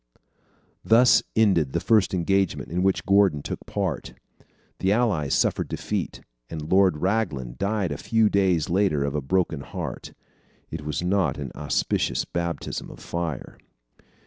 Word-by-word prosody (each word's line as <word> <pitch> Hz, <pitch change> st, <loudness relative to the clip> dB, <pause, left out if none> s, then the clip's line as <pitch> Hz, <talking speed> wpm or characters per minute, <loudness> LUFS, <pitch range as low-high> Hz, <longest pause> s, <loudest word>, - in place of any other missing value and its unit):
Thus 120 Hz, +3 st, +5 dB
ended 95 Hz, -11 st, +3 dB
the -, -, +1 dB
first 110 Hz, -4 st, +3 dB
engagement 95 Hz, -1 st, 0 dB
in 90 Hz, +1 st, 0 dB
which 95 Hz, 0 st, +1 dB
Gordon 95 Hz, -7 st, +3 dB
took -, -, -5 dB
part. 95 Hz, -8 st, -3 dB, 0.6 s
The 95 Hz, -, +1 dB
Allies 100 Hz, -, +1 dB
suffered -, -, +1 dB
defeat, -, -, -4 dB, 0.3 s
and 80 Hz, -1 st, -6 dB
Lord 95 Hz, -4 st, +4 dB
Raglan 75 Hz, -, -1 dB
died 100 Hz, -1 st, -1 dB
a -, -, -4 dB
few 110 Hz, -1 st, +2 dB
days 95 Hz, -6 st, +2 dB
later 90 Hz, -6 st, +1 dB
of 70 Hz, -1 st, -2 dB
a 75 Hz, -, -1 dB
broken 80 Hz, 0 st, 0 dB
heart. -, -, -6 dB, 0.6 s
It 80 Hz, -1 st, -5 dB
was 75 Hz, +3 st, -3 dB
not 90 Hz, -5 st, +1 dB
an 70 Hz, -4 st, -5 dB
auspicious 75 Hz, -2 st, -1 dB
baptism 85 Hz, -1 st, -4 dB
of -, -, -12 dB
fire. 85 Hz, -5 st, -5 dB
90 Hz, 145 wpm, -25 LUFS, 75-100 Hz, 0.6 s, Thus